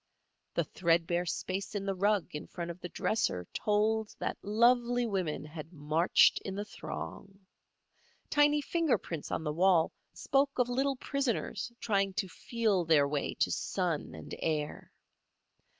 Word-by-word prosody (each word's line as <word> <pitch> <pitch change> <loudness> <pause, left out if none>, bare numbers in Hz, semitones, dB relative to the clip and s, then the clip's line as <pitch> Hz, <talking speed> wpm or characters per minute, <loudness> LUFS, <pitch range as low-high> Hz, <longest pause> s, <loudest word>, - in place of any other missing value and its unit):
The - - +2
threadbare 170 0 +1
space 190 +5 -3
in 200 -1 -2
the 195 - 0
rug 200 0 +1
in 150 - -5
front 170 -1 -5
of 170 - -11
the 180 - -6
dresser 90 - 0
told 215 +1 +1
that - - -2
lovely 240 +3 +3
woman 185 -9 -2
had 155 +1 -8
marched 155 +2 +4
in 190 - -5
the 205 +1 -3
throng. 195 -1 -7 0.9
Tiny 295 0 +4
finger 325 -1 +1
prints 165 -4 -6
on - - -2
the 150 -1 -1
wall 175 0 +4 0.2
spoke 275 0 +1
of 250 -1 +2
little 270 +2 +1
prisoners 250 -5 -2
trying 195 -4 +1
to 195 - -1
feel 215 0 0
their 155 -4 +4
way 145 0 -2
to - - +1
sun - - -2
and - - -9
air. 155 -2 -2
195 Hz, 150 wpm, -31 LUFS, 165-235 Hz, 0.9 s, marched